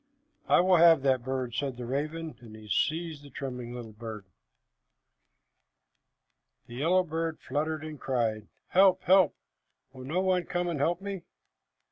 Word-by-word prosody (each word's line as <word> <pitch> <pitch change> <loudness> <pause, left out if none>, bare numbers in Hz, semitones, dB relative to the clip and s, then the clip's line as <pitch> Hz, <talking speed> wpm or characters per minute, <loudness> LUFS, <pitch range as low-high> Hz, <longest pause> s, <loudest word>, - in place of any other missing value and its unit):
"I - - +5
will 185 0 +4
have 165 -4 +6
that 130 -3 +2
bird," 130 -2 -3
said 135 0 -2
the 125 - -6
raven, 155 +4 -3
and 110 -3 -12
he 110 -1 -12
seized 155 - -1
the 145 - -13
trembling 125 -3 -6
little 115 -3 -8
thing. 110 -1 -7 2.4
The 120 - -12
yellow 170 +9 +2
bird 165 -1 -3
fluttered 155 +1 -2
and 155 -2 -7
cried, 115 -5 -1 0.2
"Help, 190 0 +5
help! 185 -3 +5 0.6
Will 130 -1 -10
no 165 +7 0
one 185 -2 +1
come 175 0 -2
and 165 -4 -2
help 170 +5 +1
me!" 200 -2 -5
145 Hz, 150 wpm, -29 LUFS, 125-170 Hz, 2.4 s, have